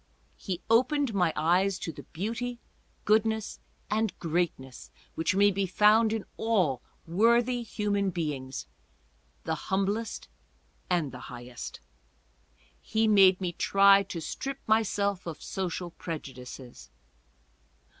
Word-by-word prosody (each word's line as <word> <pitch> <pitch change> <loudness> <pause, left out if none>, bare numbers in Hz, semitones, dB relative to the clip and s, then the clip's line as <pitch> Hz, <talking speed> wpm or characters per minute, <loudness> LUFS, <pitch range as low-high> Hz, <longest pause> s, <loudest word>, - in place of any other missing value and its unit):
He 185 -4 -4
opened 255 +3 +3
my 180 -4 +2
eyes 180 +4 +2
to 165 - -5
the - - -10
beauty, 230 +7 -4 0.5
goodness 220 0 +1 0.3
and 220 -1 -1
greatness 160 -6 -3 0.2
which 165 +3 0
may 205 +1 +5
be 195 0 -1
found 215 +4 +4
in 220 -2 -2
all 185 - +1 0.2
worthy 235 +7 +3
human 205 -3 -1
beings, 145 -7 -4 0.8
the 160 - -1 0.2
humblest 200 +4 -1 0.6
and 170 -6 +1
the 125 - -9
highest. 120 -1 -8 1.0
He 220 0 +1
made 195 -3 +6
me 180 -2 -2
try 195 +2 +5
to 190 -3 -6
strip 270 - -4
myself 200 -4 +1
of 165 - -5
social 180 -2 -4
prejudices. 130 -7 -8
195 Hz, 115 wpm, -28 LUFS, 165-220 Hz, 1.0 s, made